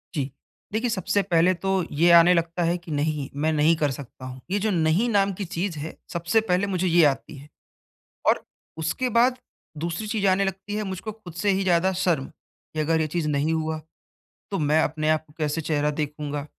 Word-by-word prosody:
जी। 140 Hz, -2 st, -2 dB, 0.4 s
देखिए, 230 Hz, +2 st, 0 dB
सबसे 200 Hz, 0 st, 0 dB
पहले 180 Hz, -1 st, +3 dB
तो 190 Hz, +1 st, 0 dB
ये 170 Hz, +4 st, +3 dB
आने 170 Hz, +1 st, +8 dB
लगता 170 Hz, +1 st, 0 dB
है 170 Hz, +1 st, +1 dB
कि 170 Hz, -2 st, -10 dB
नहीं, 145 Hz, -1 st, -1 dB
मैं 155 Hz, +2 st, +1 dB
नहीं 155 Hz, +2 st, +4 dB
कर 150 Hz, -3 st, 0 dB
सकता 130 Hz, -1 st, -9 dB
हूँ। 130 Hz, 0 st, -8 dB
ये 205 Hz, -, +1 dB
जो 215 Hz, +1 st, 0 dB
नहीं 170 Hz, +6 st, +2 dB
नाम 200 Hz, -2 st, +2 dB
की 195 Hz, +1 st, -5 dB
चीज़ 175 Hz, -2 st, -3 dB
है, 160 Hz, +2 st, -6 dB, 0.2 s
सबसे 170 Hz, +6 st, +2 dB
पहले 195 Hz, -1 st, +1 dB
मुझे 185 Hz, -1 st, 0 dB
ये 170 Hz, -1 st, +5 dB
आती 135 Hz, +2 st, -1 dB
है 145 Hz, +2 st, -13 dB, 0.8 s
और -, -, +3 dB, 0.3 s
उसके 165 Hz, +11 st, -1 dB
बाद 250 Hz, +1 st, +4 dB, 0.4 s
दूसरी 170 Hz, +6 st, -3 dB
चीज़ 210 Hz, -2 st, 0 dB
आने 190 Hz, +1 st, +3 dB
लगती 195 Hz, +2 st, -4 dB
है 215 Hz, -, -1 dB
मुझको 190 Hz, +3 st, -5 dB
खुद 185 Hz, -6 st, -12 dB
से 200 Hz, +4 st, +1 dB
ही 195 Hz, 0 st, +1 dB
ज़्यादा 180 Hz, +1 st, +3 dB
शर्म, 175 Hz, -7 st, 0 dB
कि 155 Hz, 0 st, -11 dB
अगर 160 Hz, +1 st, +2 dB
ये 155 Hz, -, +1 dB
चीज़ 155 Hz, 0 st, -2 dB
नहीं 150 Hz, +2 st, +1 dB
हुआ, 160 Hz, 0 st, -1 dB, 0.7 s
तो 195 Hz, -, -1 dB
मैं 150 Hz, +1 st, +3 dB
अपने 155 Hz, 0 st, -1 dB
आप 155 Hz, 0 st, +1 dB
को 150 Hz, -, -21 dB
कैसे 150 Hz, +1 st, -1 dB
चेहरा 150 Hz, -1 st, 0 dB
देखूँगा? 150 Hz, -1 st, -4 dB
170 Hz, 205 wpm, -25 LUFS, 155-190 Hz, 0.8 s, आने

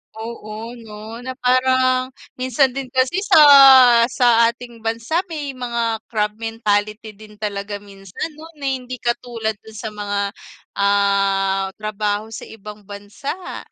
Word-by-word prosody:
Oo, 220 Hz, 0 st, -7 dB
'no 220 Hz, +1 st, -10 dB
na 255 Hz, +1 st, -7 dB
parang 255 Hz, 0 st, +2 dB, 0.3 s
minsan 255 Hz, +1 st, +2 dB
din 270 Hz, 0 st, -5 dB
kasi 260 Hz, +7 st, +1 dB
sa, 310 Hz, -, +7 dB, 0.7 s
sa 235 Hz, -2 st, +4 dB
ating 240 Hz, -1 st, -10 dB
bansa 230 Hz, +8 st, -1 dB
may 300 Hz, -4 st, -5 dB
mga 235 Hz, -3 st, -2 dB
crab 210 Hz, -2 st, -1 dB
mentality 215 Hz, -1 st, -2 dB
din 210 Hz, +1 st, -15 dB
talaga 205 Hz, -1 st, -4 dB
minsan 200 Hz, -, -8 dB
'no 310 Hz, +2 st, -12 dB
na 285 Hz, -2 st, -8 dB
hindi 255 Hz, -1 st, -5 dB
katulad 235 Hz, -2 st, -2 dB
dun 220 Hz, 0 st, -15 dB
sa 220 Hz, +1 st, -5 dB
mga, 205 Hz, -1 st, -3 dB, 0.6 s
ah, 195 Hz, -1 st, +2 dB
trabaho 215 Hz, 0 st, -3 dB
sa -, -, -8 dB
ibang 210 Hz, -1 st, -11 dB
bansa. 205 Hz, -, -7 dB
225 Hz, 130 wpm, -20 LUFS, 210-255 Hz, 0.7 s, sa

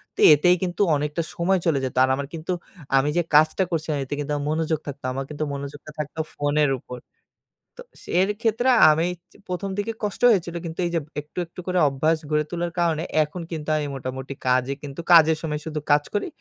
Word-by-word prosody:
তো -, -, -16 dB
এতেই 180 Hz, +5 st, +4 dB
কিন্তু 180 Hz, +2 st, -2 dB
অনেকটা 150 Hz, +3 st, -1 dB
সময় 185 Hz, +1 st, +2 dB
চলে 150 Hz, -5 st, +2 dB
যেত। 130 Hz, -, -5 dB
আর 130 Hz, -, +2 dB
আমার 140 Hz, 0 st, -4 dB
কিন্তু 165 Hz, +2 st, -4 dB, 0.5 s
আমি 140 Hz, +2 st, +2 dB
যে -, -, +4 dB
কাজটা 155 Hz, +5 st, +5 dB
করছিলাম 155 Hz, -2 st, -1 dB
এতে 135 Hz, -, -6 dB
কিন্তু 145 Hz, 0 st, -3 dB
আমার 145 Hz, 0 st, -3 dB
মনোযোগ 160 Hz, -1 st, 0 dB
থাকতো, 140 Hz, -1 st, -7 dB
আমার 135 Hz, 0 st, -3 dB
কিন্তু 150 Hz, +1 st, -4 dB
মনোযোগটা 140 Hz, +2 st, -7 dB
থাকতো 150 Hz, +1 st, -5 dB
ফোনের 145 Hz, 0 st, +1 dB
উপর। 125 Hz, 0 st, -9 dB, 0.8 s
তো -, -, -7 dB, 0.2 s
সে -, -, -14 dB
এর 195 Hz, -, +2 dB
ক্ষেত্রে 230 Hz, +3 st, +1 dB, 0.2 s
আমি 160 Hz, +3 st, +1 dB, 0.4 s
১ম 180 Hz, +2 st, -3 dB
দিকে 210 Hz, +2 st, -1 dB
কষ্ট 205 Hz, +2 st, -3 dB
হয়েছিল। 175 Hz, -5 st, +1 dB
কিন্তু 165 Hz, +2 st, -7 dB
এই 170 Hz, -, -2 dB
যে -, -, +3 dB, 0.2 s
একটু, 150 Hz, +4 st, -26 dB
একটু, 170 Hz, -, -14 dB
করে 180 Hz, -1 st, +1 dB
অভ্যাস 155 Hz, +4 st, +1 dB
গড়ে 150 Hz, 0 st, +2 dB
তোলার 175 Hz, 0 st, -2 dB
কারণে 165 Hz, -2 st, +1 dB, 0.2 s
এখন 170 Hz, +4 st, -7 dB
কিন্তু 155 Hz, -1 st, -5 dB
আমি 150 Hz, -1 st, -2 dB
মোটামুটি 130 Hz, +1 st, -5 dB
কাজে 130 Hz, +1 st, +2 dB
কিন্তু, 140 Hz, +2 st, -8 dB
কাজের 160 Hz, -2 st, +7 dB
সময় 150 Hz, -2 st, -3 dB
শুধু 155 Hz, -1 st, -3 dB
কাজ 145 Hz, 0 st, +5 dB
করি। 205 Hz, -, -1 dB
155 Hz, 200 wpm, -24 LUFS, 145-170 Hz, 0.8 s, কাজের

